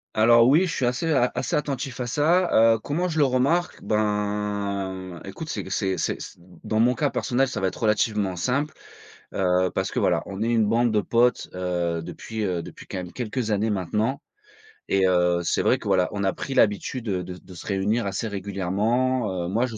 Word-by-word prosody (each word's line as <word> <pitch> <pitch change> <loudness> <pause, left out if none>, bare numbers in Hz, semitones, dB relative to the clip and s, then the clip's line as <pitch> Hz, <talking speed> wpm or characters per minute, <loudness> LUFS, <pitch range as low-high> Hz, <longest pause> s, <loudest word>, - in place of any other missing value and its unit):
Alors 115 +2 +6
oui, 160 +8 +5
je 165 - -3
suis 130 - 0
assez 125 +7 0
a 125 -4 +3
assez 125 - -2
attentif 135 -3 -3
à 125 - -1
ça, 145 -4 +4
heu. - - -2
Comment 155 +10 -1
je 160 - -3
le 145 - +5
remarque? 135 +7 +1
Ben, 100 -3 -2
écoute, 125 +11 -7
c'est - - -3
q - - -9
c'est 95 -2 0
c'est - - -2
c - - -9 0.3
dans 110 - -1
mon 120 +2 +4
cas 145 +1 0
personnel, 125 +2 0
ça 135 - -4
va 95 - 0
être - - -6
relativement 105 -3 +1
simple, 140 - -1 0.6
heu, 90 -1 +2
parce - - -1
que - - -3
voilà. - - +2
On 100 +2 -6
est 115 - +1
une 115 -2 +3
bande 115 +3 +2
de 105 -1 +2
potes, 120 +3 +2
heu, 90 -2 -1
depuis, 110 +5 -5
heu, 90 -3 -1
depuis - - -11
quand - - -6
même 90 -1 -7
quelques 120 -1 -3
années 105 +1 +1
maintenant 105 - -1 0.7
et 95 -1 +3
heu, 90 -1 +3
c'est - - +1
vrai - - +3
que - - -9
voilà, 90 -1 +2
on 100 -1 -3
a 95 - +1
pris 135 - -5
l'habitude 110 +4 +1
de 95 -4 -1
de 90 +1 -10
se 85 - -10
réunir 105 +4 0
assez 100 +3 -2
régulièrement, 100 +2 -1
heu. - - -3
Moi 115 +7 +1
je 115 -3 -6
110 Hz, 210 wpm, -24 LUFS, 95-125 Hz, 0.7 s, Alors